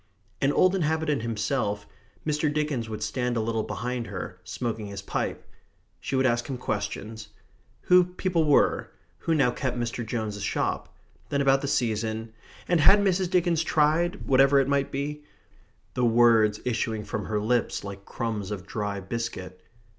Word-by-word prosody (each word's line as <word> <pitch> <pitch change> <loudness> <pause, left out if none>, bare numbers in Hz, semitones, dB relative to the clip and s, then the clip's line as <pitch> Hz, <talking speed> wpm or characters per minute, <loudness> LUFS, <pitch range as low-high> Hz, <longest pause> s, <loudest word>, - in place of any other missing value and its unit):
An 135 - +3
old 185 +5 +4
inhabitant 160 -6 0
himself, 110 -2 -1 0.4
Mr. 150 0 +1
Dickens 145 -6 -1
would 105 -1 -4
stand 125 -2 -1
a - - +2
little 110 0 0
behind 120 +1 -3
her, 90 -2 -6
smoking 115 -4 -4
his 100 -1 -7
pipe. - - -3 0.5
She 135 - -3
would 130 0 +3
ask 120 -1 +1
him 130 - -3
questions 110 -1 -4 0.5
who 180 0 +5
people 180 -2 0
were 145 - +3 0.3
who 165 - 0
now 135 -5 +3
kept 130 -1 -2
Mr. 120 0 -2
Jones's 110 -2 -3
shop - - -1 0.4
then 140 - 0
about 135 -1 +4
the 140 - -2
season 110 -2 -1 0.3
and 175 - +3
had 175 +7 +7
Mrs. 190 -2 +1
Dickens 175 -3 +2
tried, 165 +5 +1
whatever 135 +1 +5
it 135 - +2
might 140 -1 +1
be 145 +2 -3 0.7
the 125 - -1
words 115 -2 +5
issuing 115 -3 -1
from - - -4
her 105 -1 -1
lips 115 +1 0
like 100 -1 -7
crumbs 105 -3 -3
of 100 -3 -5
dry 105 -1 -3
biscuit. 95 -3 -5
120 Hz, 160 wpm, -27 LUFS, 110-150 Hz, 0.7 s, had